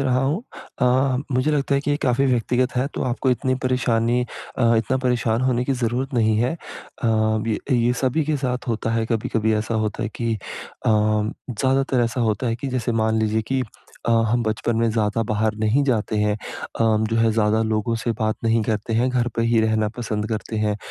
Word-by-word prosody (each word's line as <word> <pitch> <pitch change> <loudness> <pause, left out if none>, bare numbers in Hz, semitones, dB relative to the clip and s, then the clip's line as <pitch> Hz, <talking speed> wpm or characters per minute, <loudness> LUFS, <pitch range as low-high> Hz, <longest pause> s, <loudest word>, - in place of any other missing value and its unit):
रहा 130 -2 +2
हूँ 150 +10 0 0.4
अ, 130 +1 +3 0.2
मुझे 130 +4 +2
लगता 140 -1 +1
है 140 - +2
कि 145 - -2
ये 145 - +2
काफ़ी 130 +1 +2
व्यक्तिगत 125 0 +1
है 125 +2 +2
तो - - -2
आपको 130 +1 0
इतनी 130 +1 +1
परेशानी 120 -2 +1 0.4
अ, 115 -2 +4
इतना 115 +4 +1
परेशान 120 -2 +1
होने 125 -1 +1
की 135 - 0
ज़रूरत 125 +2 -2
नहीं 110 -2 +3
है। 120 +3 +1
अ, 150 -5 -8 0.4
य 110 -2 0 0.2
ये 120 0 +3
सभी 130 +4 +1
के 155 0 0
साथ 125 -2 -3
होता 115 -1 -1
है। 115 0 +1
कभी-कभी 110 -1 0
ऐसा 110 +2 -1
होता 105 - -3
है - - -1
कि 115 -1 -1
अ, 105 - -7
ज़्यादातर 110 +5 +1
ऐसा 120 +2 -2
होता 110 +1 0
है 115 -1 0
कि 135 +3 -4
जैसे 125 -2 -1
मान 110 0 +1
लीजिए 110 0 +1
कि 130 -1 +2 0.4
अ, - - +2 0.2
हम 120 +1 +2
बचपन 110 +1 -1
में 115 0 +2
ज़्यादा 110 0 0
बाहर 110 0 +1
नहीं 110 +6 +2
जाते 110 -5 0
हैं, 105 0 +2
अ, 110 - -6 0.3
जो 115 - +1
है 115 0 +3
ज़्यादा 110 0 +2
लोगों 110 +1 0
से 115 +1 -2
बात 110 0 +1
नहीं 115 0 +3
करते 110 +1 -2
हैं, 120 +3 +2
घर 125 -1 +1
पे 115 - +1
ही 115 0 +3
रहना 110 -1 +1
पसंद 110 -2 -2
करते 110 0 -3
हैं। 105 -1 0
115 Hz, 205 wpm, -22 LUFS, 110-125 Hz, 0.4 s, अ